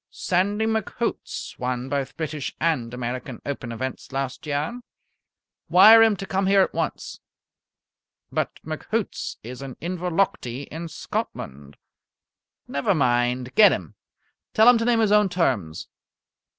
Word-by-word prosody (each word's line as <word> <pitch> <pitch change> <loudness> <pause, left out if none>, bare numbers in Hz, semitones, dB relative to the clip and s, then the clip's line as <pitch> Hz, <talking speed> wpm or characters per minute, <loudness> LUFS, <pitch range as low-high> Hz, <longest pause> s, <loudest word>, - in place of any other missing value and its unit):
"Sandy 200 +4 0
McHoots 220 +1 -3
won 125 0 -2
both 135 -1 -3
British 155 -3 -4
and 150 -8 0
American 125 0 -5
Open 135 -4 -4
events 130 +3 -5
last 135 +2 -4
year." 150 +12 -2 0.9
"Wire 220 +5 +9
him 225 -2 +5
to 195 - -6
come 190 0 0
here 195 0 +5
at - - -3
once." - - -3 1.1
"But - - 0 0.2
McHoots - - -3
is 125 +3 -8
in 135 -2 -7
Inverlochty, 175 -7 -1
in 165 +2 -5
Scotland." 70 - -6 0.9
"Never 140 +7 0
mind. 125 -2 +1
Get 215 - +7
him; - - -4 0.6
tell 220 +1 +6
him 245 -2 +7
to 230 - -1
name 235 -1 +3
his 215 -2 +2
own 210 -1 +5
terms. 125 - -1
155 Hz, 130 wpm, -24 LUFS, 125-195 Hz, 1.1 s, Wire